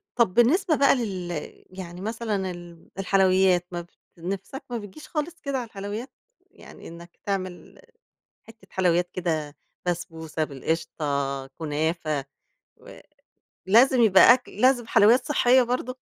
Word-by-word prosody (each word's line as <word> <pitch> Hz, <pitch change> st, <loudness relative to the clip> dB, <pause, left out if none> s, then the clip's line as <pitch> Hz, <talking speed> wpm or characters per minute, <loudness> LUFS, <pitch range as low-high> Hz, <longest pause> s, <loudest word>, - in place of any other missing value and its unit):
طب 235 Hz, -7 st, +2 dB
بالنسبة 310 Hz, -, +3 dB
بقى 280 Hz, -1 st, +4 dB
لل 190 Hz, -7 st, -4 dB, 0.4 s
يعني 180 Hz, -1 st, -9 dB
مثلًا 210 Hz, -3 st, -3 dB
ال 175 Hz, -1 st, -12 dB
الحلويات، 185 Hz, -2 st, +3 dB
ما 175 Hz, 0 st, -4 dB
ب 170 Hz, -, -15 dB, 0.3 s
نِفْسَك 195 Hz, +9 st, -6 dB
ما 240 Hz, -, -3 dB
بتجيش 205 Hz, +7 st, -10 dB
خالص 315 Hz, +1 st, -4 dB
كده 280 Hz, -2 st, -2 dB
على 245 Hz, -, -3 dB
الحلويات؟ 205 Hz, +5 st, -6 dB, 0.4 s
يعني -, -, -14 dB
إنّك 170 Hz, +1 st, -13 dB
تعمل 185 Hz, -3 st, -5 dB, 0.7 s
حِتّة 225 Hz, 0 st, -17 dB
حلويات 180 Hz, -1 st, +1 dB
كده، 155 Hz, -5 st, -2 dB, 0.3 s
بسبوسة 165 Hz, -2 st, -3 dB
بالقشطة، 140 Hz, -2 st, -3 dB
كنافة 155 Hz, 0 st, -2 dB, 0.5 s
و -, -, -14 dB, 0.7 s
لازم 245 Hz, +5 st, +5 dB
يبقى 215 Hz, +3 st, +8 dB
أكل 255 Hz, -, -7 dB
لازم 255 Hz, -2 st, +3 dB
حلويات 230 Hz, +4 st, +4 dB
صحّية 260 Hz, -3 st, +4 dB
برضه؟ 250 Hz, +1 st, -3 dB
190 Hz, 125 wpm, -25 LUFS, 170-240 Hz, 0.7 s, يبقى